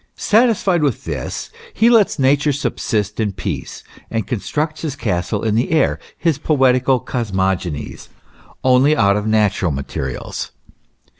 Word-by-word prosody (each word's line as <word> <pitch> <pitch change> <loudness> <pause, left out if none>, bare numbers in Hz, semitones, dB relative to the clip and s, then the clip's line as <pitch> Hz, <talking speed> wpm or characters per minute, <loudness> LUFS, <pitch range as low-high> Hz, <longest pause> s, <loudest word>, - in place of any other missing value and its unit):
Satisfied 210 -6 +2
with 140 -7 0
this, 70 -6 -5 0.2
he 225 - +4
lets 225 -8 +4
Nature 140 +2 +2
subsist 105 -6 -2
in 105 -3 0
peace, 90 -6 -5 0.3
and 115 -1 -2
constructs 150 +6 -3
his 150 -4 -3
castles 100 -3 -2
in 110 - +1
the 115 +3 +1
air, 160 -4 +2 0.2
his 165 -5 0
poetical 130 -3 +3
cosmogonies, 95 - -3 0.5
only 130 +4 +4
out 100 -2 +4
of 105 +1 -2
natural 105 -4 +2
materials. 70 -2 -5
120 Hz, 130 wpm, -19 LUFS, 100-150 Hz, 0.5 s, he